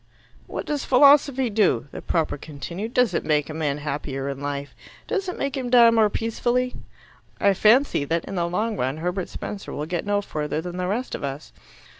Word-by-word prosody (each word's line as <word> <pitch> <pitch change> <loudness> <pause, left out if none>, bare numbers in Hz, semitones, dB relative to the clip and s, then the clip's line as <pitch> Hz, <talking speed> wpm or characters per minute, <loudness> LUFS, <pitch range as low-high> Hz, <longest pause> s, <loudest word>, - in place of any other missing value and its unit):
"What - - -5
does 295 -2 -2
philosophy 270 -2 +5
do?" 200 - +2
the - - -7
propper 160 -4 0
continued. 170 +9 -6
"Does 250 -2 +3
it - - 0
make 150 -1 +1
a - - -6
man 150 -3 -1
happier 140 -2 -4
in 135 -1 -5
life? 145 0 -4 0.3
Does 390 -4 -1
it - - -5
make 275 -1 -2
him 255 -2 -3
die 240 -2 +7
more 220 -2 +4
peacefully? 240 +3 -1 0.7
I 200 - +4
fancy 220 - +4
that 165 +3 -1
in - - -7
the 170 -2 -1
long 215 +4 -1
run 130 +4 -1
Herbert 180 +3 -3
Spencer 205 - -6
will 150 - -4
get 175 +1 -3
no 205 0 +2
further 150 -3 -3
than 175 +2 -6
the 180 0 -2
rest 230 +7 -2
of - - -5
us. 140 +2 -5
185 Hz, 200 wpm, -24 LUFS, 150-240 Hz, 0.7 s, die